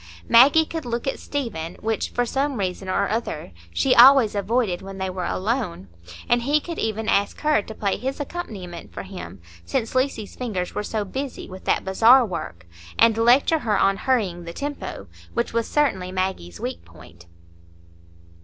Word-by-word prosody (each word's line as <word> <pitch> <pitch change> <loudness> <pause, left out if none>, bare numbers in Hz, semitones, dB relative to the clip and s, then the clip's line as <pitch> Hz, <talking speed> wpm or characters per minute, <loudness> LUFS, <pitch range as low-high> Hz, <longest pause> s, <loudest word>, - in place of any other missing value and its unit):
Maggie 280 +7 +7
could 325 0 -5
look 240 -1 -3
at 270 - -2
Stephen, 185 - -4
which, 220 0 -2
for 245 - 0
some 275 +2 -1
reason 190 -1 -3
or - - +1
other 215 - -3 0.2
she 85 0 +2
always 255 -2 +7
avoided 205 -2 0
when 195 0 -8
they 190 -1 -2
were 180 -1 -3
alone; 185 - -2 0.4
and 240 0 +3
he 290 +5 +2
could 335 +2 -7
even 220 0 -2
ask 200 -2 +1
her 305 -6 +3
to 220 +2 -10
play 200 -2 -1
his 265 +3 -4
accompaniment 210 - -7
for - - -7
him, 180 - -9 0.2
since 85 - -2
Lucy's 255 -5 -1
fingers 200 -8 -3
were - - -2
so 210 0 -3
busy 265 +6 -5
with 185 0 -11
that - - +1
bazaar 230 +7 +6
work, 125 - -6 0.3
and 230 -1 +5
lecture 245 +8 +4
her 220 -6 0
on 195 0 +3
hurrying 195 -8 0
the 170 0 -7
tempo, 290 +7 -5 0.3
which 235 - -1
was 230 -1 0
certainly 195 -12 0
Maggie's 185 - -3
weak 85 - -5
point. 85 0 -16
220 Hz, 175 wpm, -23 LUFS, 185-255 Hz, 0.4 s, Maggie